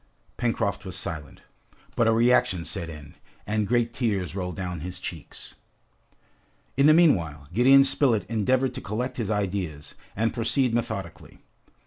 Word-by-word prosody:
Pencroft 115 -5 -1
was 95 -3 -6
silent, 80 -6 -6 0.5
but 115 - +2
a - - +5
reaction 115 -7 +3
set 85 - -4
in, 75 -2 -10 0.3
and 105 0 -1
great 120 0 +1
tears 100 - -1
rolled 90 -3 -4
down 90 -3 -4
his 90 +3 -6
cheeks. 85 -3 -9 1.2
In 140 +2 +4
the - - +8
meanwhile, 85 - +2
Gideon 135 +4 +6
Spilett 130 -7 +2
endeavored 125 +4 +1
to - - -6
collect 120 +5 -4
his 110 -4 -2
ideas, 95 -8 -3 0.2
and 115 +2 0
proceed 120 +1 0
methodically. 110 -7 -4
105 Hz, 140 wpm, -25 LUFS, 90-120 Hz, 1.2 s, the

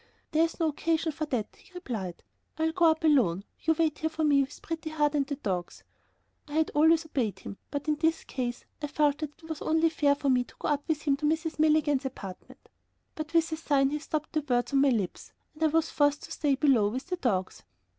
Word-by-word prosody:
"There's 325 +1 +1
no 325 -2 +2
occasion 320 +2 0
for 310 +1 -4
that," 230 -7 -3
he - - -21
replied; 215 - -5 0.3
"I'll 320 0 +1
go 345 +1 +2
up 320 0 +3
alone; 230 - +3 0.2
you 320 0 +1
wait 315 -2 +1
here 315 - 0
for 320 0 -3
me 285 -2 +4
with 275 +1 -5
Pretty 330 -1 -4
Heart 300 -1 +1
and 280 -2 +1
the 285 - -2
dogs." 185 -10 -4 0.6
I 290 - -10
had 315 +1 +1
always 320 +2 +4
obeyed 235 - -2
him, 195 - -9
but 285 +1 -4
in 300 -1 +1
this 320 +1 +1
case 245 -2 -4 0.2
I 295 - -2
felt 295 0 +1
that 300 -2 -5
it 320 - -15
was 320 -2 -5
only 320 +1 +2
fair 290 -3 +3
for 280 -1 -1
me 250 -1 +3
to - - -19
go - - -3
up 290 -1 +1
with 305 -2 -1
him 280 -2 +2
to 295 +1 0
Mrs. 320 0 -1
Milligan's 305 -3 +3
apartment. 195 -8 -8 0.5
But 310 +2 -6
with 330 0 +3
a 315 - -2
sign 280 -4 +2
he 300 - -1
stopped 310 0 -4
the 310 - +1
words 245 -3 0
on 275 - +4
my 280 - +5
lips, 210 -8 -2 0.2
and 310 - -18
I 320 - +5
was 325 +1 +1
forced 290 0 +2
to - - -10
stay 290 -3 +1
below 260 -6 +4
with 255 +5 -4
the 365 0 -3
dogs. 190 - -1
295 Hz, 235 wpm, -28 LUFS, 270-320 Hz, 0.6 s, my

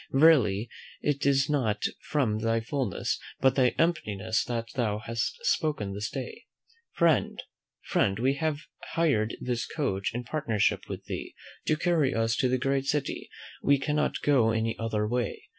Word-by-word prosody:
Verily, 130 -8 +5 0.4
it 145 -1 +1
is 135 0 +3
not 115 -8 0 0.2
from 125 -8 0
thy 115 +1 +1
fulness, 120 -3 -2 0.2
but 130 -1 +4
thy 125 -2 +3
emptiness 110 - 0
that 115 -2 -2
thou 110 -5 0
hast 115 - -3
spoken 145 - 0
this 105 +2 -3
day. 135 - -6 0.5
Friend, 170 -2 +2 0.4
friend, 95 -1 +1
we 130 +4 +2
have 155 0 -1 0.3
hired 135 -10 +2
this 120 -2 -2
coach 100 -11 -1
in 120 - -2
partnership 120 -6 0
with - - -6
thee, - - -6 0.3
to 155 - +3
carry 160 -5 +2
us 115 +1 +1
to 130 - +2
the 130 - +2
great 135 +1 0
city; 145 -1 -2 0.3
we 140 0 +4
cannot 150 +2 -1
go 130 -6 +4
any 110 0 0
other 110 -2 -1
way. 120 +1 -2
125 Hz, 155 wpm, -28 LUFS, 110-145 Hz, 0.5 s, Verily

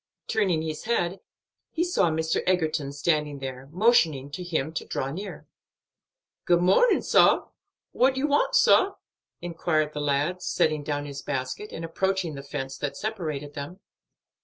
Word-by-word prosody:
Turning 190 -8 +1
his 155 +2 -5
head, 190 -5 0 0.5
he 330 - -1
saw 270 - +2
Mr. 160 0 0
Egerton 155 -6 +1
standing 150 0 0
there, 135 0 -7
motioning 165 - +3
to 180 +5 -5
him 160 -3 -2
to - - -3
draw 135 +1 -3
near. 195 +7 -7 1.0
"Good 175 -1 +4
mornin', 195 - +4
sah. - - +4 0.4
What 265 +1 +2
you 265 - +1
want, 290 0 +2
sah?" 390 +1 +5 0.5
inquired 160 -3 0
the 150 - -3
lad, 145 +5 0
setting 155 -3 +1
down 145 0 -2
his 140 -1 -7
basket, 135 +9 -4
and 165 - -5
approaching 190 0 -1
the 140 - -7
fence 135 -1 -6
that 145 - -3
separated 155 -10 -4
them. 145 +7 -7
160 Hz, 150 wpm, -26 LUFS, 145-185 Hz, 1.0 s, sah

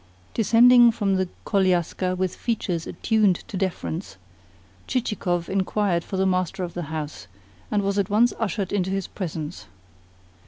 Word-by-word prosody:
Descending 240 +2 +6
from 200 -4 0
the 185 -1 -1 0.2
koliaska 185 -1 +1
with 185 -1 -1
features 185 -8 -2
attuned 215 -5 +2
to 215 - -7
deference, 100 - -3 0.7
Chichikov 185 -8 -1
inquired 190 -2 0
for 190 - -5
the 190 - +2
master 185 0 0
of 175 -1 -5
the 175 - -4
house, 150 -10 -5 0.4
and 205 -1 +1
was 200 +1 0
at 195 - 0
once 225 +4 +3
ushered 200 -3 -2
into 190 -2 0
his 195 -1 -1
presence. 160 - -6
190 Hz, 145 wpm, -24 LUFS, 175-210 Hz, 0.7 s, Descending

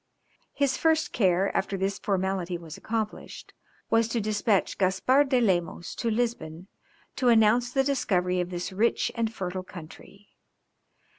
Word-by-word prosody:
His 280 -2 0
first 320 -1 +1
care 190 -2 +2
after 195 0 -1
this 195 +1 -2
formality 190 -3 -1
was 165 -2 -10
accomplished 220 -1 -5 0.4
was 225 0 +3
to 230 +1 -1
despatch 210 -1 0
Gaspard 255 +9 +3
de 255 -2 +3
Lemos 175 -6 0
to 235 - -2
Lisbon, 215 -8 -2 0.5
to 255 - +1
announce 230 +2 +4
the 270 +1 +2
discovery 185 -10 0
of 175 - -4
this 180 +1 -5
rich 220 +5 +1
and 230 -2 -1
fertile 185 -3 -4
country. 185 +3 -13
200 Hz, 140 wpm, -27 LUFS, 185-235 Hz, 0.5 s, announce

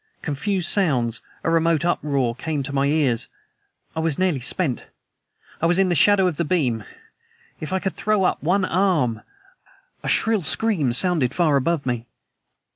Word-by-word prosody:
Confused 175 +4 -2
sounds 125 - +1 0.2
a 165 - 0
remote 165 0 +2
uproar 140 -8 0
came 145 +3 -3
to 140 - -5
my 140 0 +1
ears. 140 -6 +1 0.7
I - - -2
was 160 -3 0
nearly 185 -7 +1
spent... 135 +1 -2 0.8
I 165 - +3
was 175 +1 +2
in 190 -1 +3
the - - +2
shadow 190 +4 +4
of 175 -5 -1
the 170 - 0
beam! 135 -10 0 0.8
If 155 - -6
I 190 - +1
could 190 0 -3
throw 215 -2 0
up - - 0
one 185 +5 +1
arm... 160 - +1 0.8
A - - -4
shrill 220 -2 +3
scream 165 - 0
sounded 140 -1 +3
far 160 -5 +2
above 140 +2 0
me! 120 -2 -3
160 Hz, 165 wpm, -22 LUFS, 135-185 Hz, 0.8 s, shadow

